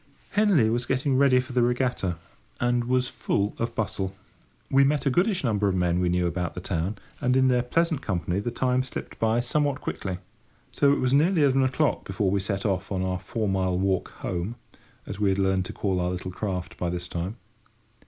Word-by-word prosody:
Henley 200 - +4
was 120 +1 -1
getting 130 +1 +1
ready 130 -1 +5
for 130 0 -5
the 125 - +3
regatta, 120 -7 0 0.4
and 120 0 +1
was 125 0 +1
full 100 -3 -1
of 115 0 -2
bustle. 95 -3 -2 0.6
We 135 +1 +6
met 145 +2 +1
a 140 - +3
goodish 185 - +2
number 105 -5 +1
of 95 - +1
men 90 -1 +1
we 90 -1 +1
knew 90 0 +1
about 85 0 -2
the - - -4
town, 90 +2 -2 0.2
and 125 +1 +2
in 130 0 +4
their 125 -1 +3
pleasant 160 +4 0
company 90 -3 -1
the 105 - -2
time 125 +1 +1
slipped 130 - -7
by 115 +1 +2
somewhat 145 +2 0
quickly; 95 -9 -4 0.5
so 140 - +3
that 140 - +5
it - - -2
was 130 0 +1
nearly 160 +3 +4
eleven 135 -1 +4
o'clock 130 +3 +1
before 95 0 -1
we 100 - +2
set 100 0 -3
off 95 -1 -1
on 95 -1 -1
our 95 0 -1
four 110 +1 -3
mile 95 -2 +1
walk 95 -1 0
home—as 100 +1 -7
we 105 -2 +3
had 95 - +1
learned 95 -1 +1
to - - -5
call 95 -3 -1
our 90 0 0
little 90 0 -4
craft 90 -2 -4
by 90 - -1
this 90 0 -4
time. 90 +7 -4
110 Hz, 210 wpm, -26 LUFS, 95-130 Hz, 0.6 s, We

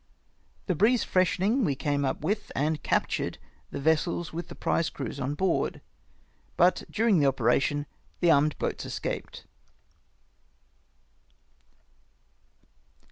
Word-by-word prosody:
The 185 - +1
breeze 220 +8 +3
freshening 190 +7 +2
we 145 -8 +1
came 145 +1 -1
up 130 - -2
with 205 +7 -2
and 150 +3 +1
recaptured 155 - -1 0.3
the - - -5
vessels 160 +3 0
with 170 +1 -5
the - - -10
prize 165 - 0
crews 135 0 -6
on 140 +2 -2
board, 185 +3 0 0.8
but 180 +2 +4
during 220 -4 +3
the 145 - +4
operation 135 +3 +1 0.3
the 175 -2 +4
armed 150 0 +3
boats - - -3
escaped. - - -5
160 Hz, 115 wpm, -28 LUFS, 145-185 Hz, 0.8 s, but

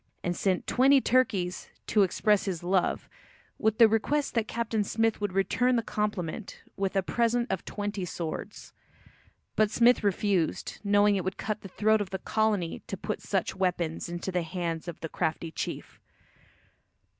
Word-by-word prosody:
And 175 0 -1
sent 185 +1 0
twenty 270 +2 +5
turkeys 230 -9 +1 0.2
"to 210 - +3
express 200 +2 +2
his 180 -4 -3
love," 180 0 +1 0.5
with 220 0 +1
the 230 -2 +8
request 275 +7 0
that 225 -2 0
Captain 225 -2 -1
Smith 225 +1 0
would 205 -3 -1
return 235 +6 +2
the 230 - +1
compliment 210 -3 -3
with 195 0 -2
a 195 - +2
present 235 +4 +1
of 190 - -2
twenty 205 -2 -4
swords. 175 +3 -6 0.8
But 215 -1 +3
Smith 235 +2 +4
refused, 200 -4 0
knowing 205 0 +4
it 185 - -2
would 190 +2 -3
cut 215 -1 -3
the - - -8
throat 215 +3 +2
of 200 - -3
the 190 - -3
colony 210 -3 0
to 195 - -4
put 215 - -4
such 195 -3 -1
weapons 175 -4 -1
into 175 +2 -4
the 180 -1 0
hands 165 -1 -4
of 170 - -6
the 165 - -3
crafty 160 +1 -2
chief. - - -5
200 Hz, 165 wpm, -28 LUFS, 180-220 Hz, 0.8 s, the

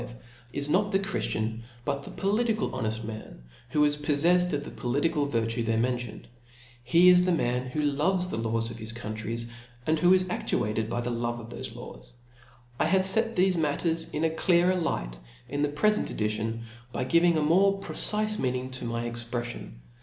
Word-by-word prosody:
v. 120 0 -9 0.4
is 145 +2 -1
not 200 +7 +2
the 195 - +4
chrijiicin, 115 - -2 0.2
hut 140 -1 -1
the - - -9
pdliticdl 215 +2 0
honejl 110 -3 -2
man^ 110 -1 -7 0.3
who 150 +3 +3
is 145 0 +3
poffejfed 165 +5 +2
of 145 -2 -1
the - - -8
political 145 +4 0
virtue 115 -2 -1
there 115 0 0
mentioned, 120 -2 -2 0.6
tie - - +3
'is 180 0 +8
the 185 - +2
man 125 -6 0
who 150 +4 -2
loves 155 +6 +2
the 180 - -4
laws 115 0 -1
of^is 110 -1 -7
country 110 0 -4 0.2
,' 120 0 -23
md 155 0 +2
who 180 +3 +6
is^aSluatedby 115 - -1
the 120 - -2
love 120 0 -2
oftbbfe 115 0 -7
laws, - - -11 0.7
^t/have 185 +4 +3
fet 225 +4 +2
thefe 185 0 +4
nidtiers 160 +1 0
in 150 - -2
a 160 - +2
clear 175 +2 +3
er^llght 65 - -2 0.3
in 145 +3 -3
tfJept 145 0 0
efent 210 +7 +2
eiitionf 110 +2 -1 0.3
by - - -2
giving' 170 +5 +4
a 155 - +1
more 195 +5 +4
pNcife 215 +2 -2
meaning 130 0 -1
tcf 130 -2 -4
my 115 0 -2
exprejjion 120 - -5
145 Hz, 175 wpm, -28 LUFS, 115-180 Hz, 0.7 s, is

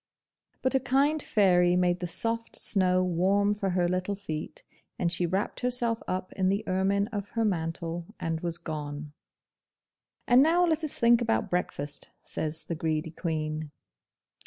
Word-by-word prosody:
But 260 - +2
a 265 - +4
kind 280 +4 +2
fairy 180 -4 +3
made 180 0 +2
the 180 - -3
soft 230 +6 -1
snow 185 -3 +2
warm 190 +4 +2
for 205 -2 -2
her 180 -1 +1
little 185 +3 -1
feet, 195 - -5 0.3
and 170 -2 0
she 175 0 0
wrapped 190 +4 -2
herself 240 -2 +2
up 185 0 -3
in 185 -1 +1
the 200 +3 -1
ermine 195 +2 +2
of 205 -3 -4
her 225 - +3
mantle, 165 -2 -2
and 165 -1 -2
was 170 -1 -2
gone! 150 -3 -6 1.1
'And 245 +2 +7
now 335 +4 +4
let 320 -1 +1
us 305 - -2
think 235 0 +5
about 225 -3 0
breakfast,' 150 -5 -3
says 160 +1 -3
the - - -4
greedy 160 0 -2
Queen. 155 -2 -3
185 Hz, 160 wpm, -28 LUFS, 165-225 Hz, 1.1 s, And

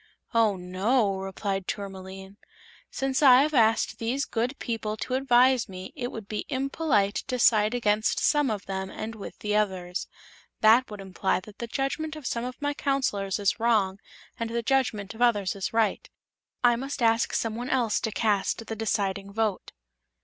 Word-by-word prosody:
"Oh, 225 -3 +3
no," 195 +3 0
replied 195 0 -3
Tourmaline. 195 -1 -7 0.5
"Since 270 +1 -1
I 265 -2 +8
have 305 +1 -1
asked 225 -3 +3
these 255 +5 -1
good 245 +4 -2
people 220 -2 -3
to 255 - -4
advise 255 -2 +4
me 185 0 -8
it 245 0 -4
would 220 -3 -8
be 210 - -4
impolite 270 -6 +1
to 255 -1 -1
side 215 -1 +4
against 215 -2 +1
some 295 -3 +2
of 205 -3 -3
them 190 0 -4
and 220 +3 -6
with 215 -3 -9
the 210 0 -2
others. 185 -4 -1 0.5
That 225 +4 +5
would 210 -2 -8
imply 190 0 -1
that 205 +2 -15
the 235 - -4
judgment 275 +5 -2
of 305 -4 -10
some 235 0 -2
of 250 0 -7
my 290 0 -1
Counselors 230 -10 -1
is 205 +1 0
wrong, 210 -4 +2 0.4
and 230 0 -2
the 235 0 -2
judgment 230 -6 0
of 225 - -10
others 205 -5 +1
right. 225 -2 0 0.5
I 240 -1 +5
must 270 0 -4
ask 230 0 +3
some 225 -1 -1
one 245 +2 -5
else 235 -5 +1
to 220 - -2
cast 210 0 0
the 225 - -5
deciding 200 -2 -2
vote." 215 -2 -2
225 Hz, 170 wpm, -27 LUFS, 200-250 Hz, 0.5 s, I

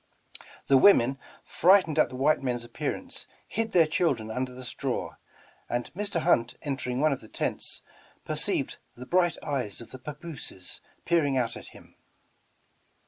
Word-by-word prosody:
The 135 -1 +6
women, 135 -7 +6 0.2
frightened 175 -3 +4
at - - +5
the - - -8
white 140 +4 +3
men's 120 -3 -2
appearance, - - -4 0.2
hid 225 +1 -2
their 170 -3 +6
children 140 -9 0
under 125 +2 -2
the 130 +1 -9
straw, 120 - -3 0.6
and 120 0 -2
Mr. 200 -2 -2
Hunt 120 -8 +2
en 140 -2 -1
tering 125 0 -3
one 155 -1 +4
of 135 - -6
the 110 - -13
tents, - - -3 0.4
perceived - - -1 0.2
the 125 - -9
bright 175 +2 +2
eyes 130 -9 -2
of 120 - -11
the 130 - -9
papooses 145 - -8 0.2
peering 150 -6 +2
out 120 -3 0
at - - -10
him. - - -15
135 Hz, 155 wpm, -28 LUFS, 125-165 Hz, 0.6 s, The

